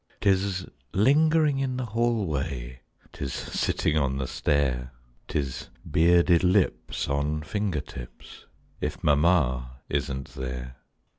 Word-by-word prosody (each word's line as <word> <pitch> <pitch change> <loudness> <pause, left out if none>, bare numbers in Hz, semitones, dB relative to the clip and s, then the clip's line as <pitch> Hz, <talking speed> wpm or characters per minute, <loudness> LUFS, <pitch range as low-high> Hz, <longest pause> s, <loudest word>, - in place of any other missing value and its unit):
'Tis 95 -2 +1 0.3
lingering 150 - +4
in 130 -2 -1
the 130 - -2
hallway, 80 - -1 0.3
'Tis 70 - -4
sitting - - -1
on 70 -2 0
the 65 - -1
stair, 65 -3 0 0.4
'Tis 65 -2 -3 0.2
bearded 85 +1 +5
lips 95 +1 +1
on 75 +2 -1
finger 100 -2 -1
tips, 65 -4 -11 0.3
If - - -4
mamma 70 -5 +2
isn't 70 -2 -2
there. 65 -1 -6
75 Hz, 105 wpm, -27 LUFS, 65-100 Hz, 0.4 s, bearded